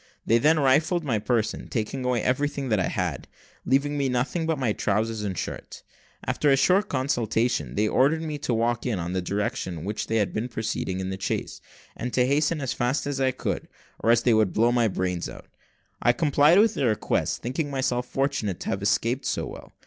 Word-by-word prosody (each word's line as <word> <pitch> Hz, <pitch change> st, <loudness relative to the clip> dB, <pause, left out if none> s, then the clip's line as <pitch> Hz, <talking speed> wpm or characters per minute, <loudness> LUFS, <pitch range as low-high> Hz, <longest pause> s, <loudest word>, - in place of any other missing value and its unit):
They 115 Hz, -, +4 dB
then 155 Hz, +4 st, +4 dB
rifled 155 Hz, +6 st, +3 dB
my 120 Hz, -7 st, 0 dB
person, 110 Hz, 0 st, -1 dB
taking 120 Hz, +4 st, -3 dB
away 125 Hz, -2 st, 0 dB
everything 140 Hz, +1 st, 0 dB
that 110 Hz, -3 st, +2 dB
I 90 Hz, -, +1 dB
had, -, -, -3 dB, 0.4 s
leaving 145 Hz, +2 st, +1 dB
me 135 Hz, -1 st, +1 dB
nothing 135 Hz, +7 st, -1 dB
but 160 Hz, -2 st, 0 dB
my 125 Hz, -6 st, 0 dB
trowsers 110 Hz, +2 st, -1 dB
and 95 Hz, -4 st, -3 dB
shirt. -, -, -6 dB, 0.4 s
After 150 Hz, -, +1 dB
a 135 Hz, -, +5 dB
short 185 Hz, +7 st, +3 dB
consultation, 120 Hz, -, 0 dB
they 105 Hz, -, +2 dB
ordered 150 Hz, +8 st, +2 dB
me 155 Hz, -2 st, -4 dB
to 140 Hz, -, -2 dB
walk 115 Hz, 0 st, 0 dB
on 115 Hz, -5 st, 0 dB
in 85 Hz, +1 st, -3 dB
the 95 Hz, -, 0 dB
direction 100 Hz, -1 st, -2 dB
in 80 Hz, -, -7 dB
which 105 Hz, +2 st, -3 dB
we 115 Hz, -, 0 dB
had 105 Hz, -3 st, +1 dB
been 110 Hz, +3 st, -2 dB
proceeding 105 Hz, -4 st, -3 dB
in 95 Hz, 0 st, -3 dB
the 95 Hz, 0 st, -6 dB
chaise, -, -, -3 dB, 0.3 s
and 125 Hz, +1 st, -4 dB
to 125 Hz, -, +4 dB
hasten 145 Hz, +3 st, +1 dB
as 130 Hz, -, -2 dB
fast 125 Hz, +4 st, 0 dB
as 140 Hz, -1 st, -2 dB
I 130 Hz, -, +3 dB
could, 130 Hz, -, -3 dB, 0.3 s
or 115 Hz, +1 st, +4 dB
they 120 Hz, 0 st, +2 dB
would 110 Hz, -3 st, +2 dB
blow 115 Hz, +2 st, +3 dB
my 120 Hz, -2 st, +3 dB
brains 90 Hz, -3 st, -2 dB
out. -, -, -11 dB, 0.6 s
I 120 Hz, -, +4 dB
complied 150 Hz, +4 st, +4 dB
with 220 Hz, +1 st, +5 dB
their 130 Hz, -4 st, +1 dB
request, 110 Hz, -, -1 dB
thinking 145 Hz, +5 st, -2 dB
myself 130 Hz, -3 st, -1 dB
fortunate 135 Hz, -10 st, -1 dB
to -, -, -4 dB
have 95 Hz, -, -2 dB
escaped 115 Hz, +5 st, 0 dB
so -, -, -1 dB
well. -, -, -10 dB
125 Hz, 210 wpm, -25 LUFS, 110-140 Hz, 0.6 s, a